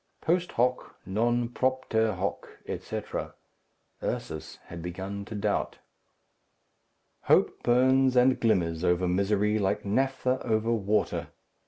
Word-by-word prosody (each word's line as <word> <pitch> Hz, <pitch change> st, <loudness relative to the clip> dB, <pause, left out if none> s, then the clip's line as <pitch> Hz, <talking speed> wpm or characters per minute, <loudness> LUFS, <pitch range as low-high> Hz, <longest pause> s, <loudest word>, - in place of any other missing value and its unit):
Post 175 Hz, +2 st, 0 dB
hoc, 125 Hz, +2 st, 0 dB
non 120 Hz, +4 st, +1 dB
propter 120 Hz, -4 st, 0 dB
hoc, 95 Hz, +2 st, -3 dB, 0.2 s
etc. -, -, -5 dB, 0.7 s
Ursus -, -, -4 dB
had 85 Hz, 0 st, -8 dB
begun 95 Hz, +4 st, -5 dB
to 110 Hz, -, -7 dB
doubt. 105 Hz, 0 st, -1 dB, 1.5 s
Hope -, -, +3 dB
burns 130 Hz, +1 st, +4 dB
and 125 Hz, +1 st, +4 dB
glimmers 90 Hz, -7 st, +1 dB
over 90 Hz, 0 st, +2 dB
misery 105 Hz, +3 st, +1 dB
like 95 Hz, 0 st, 0 dB
naphtha 130 Hz, +4 st, 0 dB
over 110 Hz, 0 st, +1 dB
water. 105 Hz, -1 st, 0 dB
110 Hz, 110 wpm, -28 LUFS, 100-125 Hz, 1.5 s, burns